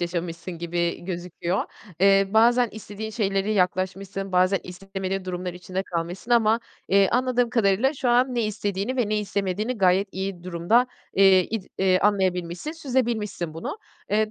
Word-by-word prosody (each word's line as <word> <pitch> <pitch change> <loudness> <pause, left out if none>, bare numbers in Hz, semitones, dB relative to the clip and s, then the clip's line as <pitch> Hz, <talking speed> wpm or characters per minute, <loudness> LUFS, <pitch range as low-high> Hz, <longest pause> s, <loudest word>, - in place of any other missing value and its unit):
yaşamışsın 170 0 -4
gibi 170 0 -2
gözüküyor. 175 +1 -3 0.4
Eee, 195 0 +5
bazen 235 +2 +4
istediğin 220 0 -7
şeylere 200 -2 0
yaklaşmışsın, 190 +1 -1
bazen 185 +2 +3
istemediğin 195 +1 -5
durumlar 180 -1 -4
içinde 185 +1 -4
kalmışsın 175 +5 -5
ama, 230 -1 +4 0.3
eee, 195 -1 +4
anladığım 250 -1 +1
kadarıyla 230 +4 +2
şu 260 -3 -1
an 250 +1 +3
ne 235 - +1
istediğini 205 +3 -2
ve 235 -5 +1
ne 215 0 +1
istemediğini 205 +3 -2
gayet 190 +1 +3
iyi 190 -2 -4
durumda, 185 +8 +2 0.3
eee, 190 -1 +6
id 220 0 -3 0.2
eee, 185 -1 +3
anlayabilmişsin, 185 - 0
süzebilmişsin 235 - -2
bunu. 170 - -5 0.3
Eee, 215 +1 +2
195 Hz, 145 wpm, -24 LUFS, 180-220 Hz, 0.4 s, eee